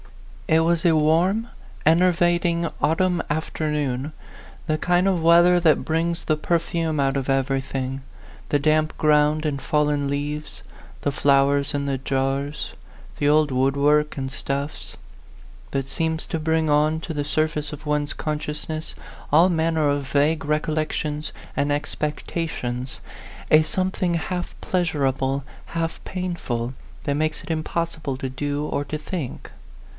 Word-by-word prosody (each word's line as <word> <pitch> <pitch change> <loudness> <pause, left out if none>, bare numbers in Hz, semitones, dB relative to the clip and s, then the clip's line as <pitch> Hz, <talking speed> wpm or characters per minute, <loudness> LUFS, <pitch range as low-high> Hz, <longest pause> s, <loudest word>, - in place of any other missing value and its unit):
It 160 0 +4
was 165 0 +2
a 165 -2 +4
warm, 170 +9 +3 0.4
enervating, 170 0 +3
autumn 180 +3 +2
after 155 0 -2
noon; 140 -1 -1 0.6
the 155 - +1
kind 180 +3 +2
of 185 -3 +2
weather 170 +2 +6
that 155 -6 +3
brings 165 +2 -1
the 155 - +2
perfume 165 -1 0
out 135 0 +2
of 135 -1 -2
everything, 135 0 -1 0.5
the 145 - +2
damp 155 +1 +2
ground 150 0 +3
and 140 -3 -1
fallen 150 -2 +1
leaves, 145 +2 -4 0.4
the 145 - +1
flowers 140 0 +3
in 140 0 -1
the 135 -2 -1
jars, 135 +2 -2 0.4
the 145 - +2
old 150 -1 +4
woodwork 140 +4 +2
and 135 -1 -2
stuffs; 140 +2 -4 0.7
that 135 -1 -2
seems 160 +2 -1
to 165 - -3
bring 160 0 +1
on 150 +2 +3
t6 160 0 -6
the 145 - 0
surface 150 0 -1
of 150 +1 -9
one's 150 0 0
consciousness 155 +1 -3 0.4
all 165 +5 +7
manner 160 -2 +1
of 145 -1 0
vague 145 +2 +2
recollections 150 0 -1 0.2
and 145 +1 +1
expec 150 0 -2
tations, 130 -6 -3 0.5
a 155 - +8
something 185 +1 0
half 175 +2 -3
pleasurable, 140 -6 0 0.2
half 165 0 -3
painful, 170 -10 -3 0.3
that 145 - +1
makes 155 +1 -1
it 180 - -5
impossible 160 -3 -2
to 135 - -3
do 145 +3 -2
or 145 - -1
to 155 +2 -4
think. 155 -3 -5
150 Hz, 140 wpm, -23 LUFS, 140-165 Hz, 0.7 s, a